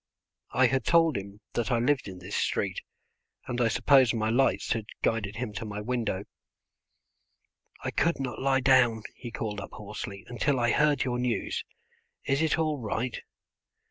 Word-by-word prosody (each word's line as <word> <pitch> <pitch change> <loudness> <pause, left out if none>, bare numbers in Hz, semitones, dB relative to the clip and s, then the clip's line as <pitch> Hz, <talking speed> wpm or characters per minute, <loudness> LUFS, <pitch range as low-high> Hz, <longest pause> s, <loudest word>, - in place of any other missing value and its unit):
I 130 - +3
had 130 +2 +2
told 165 -3 +4
him 100 +1 -6
that 120 -2 -1
I 120 - +2
lived 130 +2 +1
in 95 -2 -7
this 90 +2 -6
street, - - 0 0.6
and 120 0 -2
I 120 - +4
suppose 125 +2 +4
my 110 -1 0
lights 135 +3 +2
had 110 -2 -4 0.2
guided 105 -3 0
him 115 -2 -4
to 100 - -5
my 105 -1 -5
window. 110 -4 -2 1.6
"I - - -2
could 170 -1 +1
not 125 -4 -4
lie 135 0 +2
down," 125 -4 +4
he 120 - -8
called 105 -3 -4
up - - -9
hoarsely, 100 -2 -7
"until 125 +4 0
I 120 -1 +2
heard 150 -1 +3
your 125 -1 -1
news. 120 -5 -1 0.6
Is 135 +2 +1
it 160 - +2
all 155 -3 0
right?" 115 +2 -3
120 Hz, 170 wpm, -28 LUFS, 105-135 Hz, 1.6 s, told